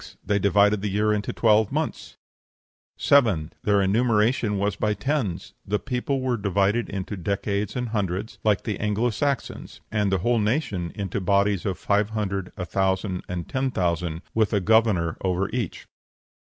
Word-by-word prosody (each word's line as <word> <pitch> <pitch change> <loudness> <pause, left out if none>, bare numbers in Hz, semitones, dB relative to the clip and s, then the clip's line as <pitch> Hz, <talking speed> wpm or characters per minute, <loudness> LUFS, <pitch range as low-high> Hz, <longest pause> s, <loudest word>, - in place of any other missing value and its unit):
They 100 0 +1
divided 100 +1 +3
the 105 - -1
year 105 +2 +1
into 105 0 -2
twelve 110 -2 +3
months. - - -3 0.8
7. 100 - +3
Their 100 -1 +2
enumeration 110 +1 +2
was 100 0 0
by 105 +1 0
tens; 105 - -2
the 105 - 0
people 130 +3 -2
were 130 -2 0
divided 100 +3 +1
into 100 +1 -4
decades 100 +2 -2
and 125 -2 -2
hundreds, 105 -1 -3
like 105 -2 +2
the 105 -4 -3
Anglo 110 +3 0
Saxons; 140 +4 -3
and 105 -2 +1
the 95 - +3
whole 120 -1 +3
nation 105 - -1
into 100 -2 -3
bodies 100 0 +2
of 95 - -2
500, 100 -2 -1
1000, 95 +1 -1
and 90 -2 -4
10,000, 90 - -1
with 110 0 +1
a 100 - +3
governor 100 -5 +2
over 95 +1 0
each. 120 -8 -3
105 Hz, 150 wpm, -24 LUFS, 95-110 Hz, 0.8 s, divided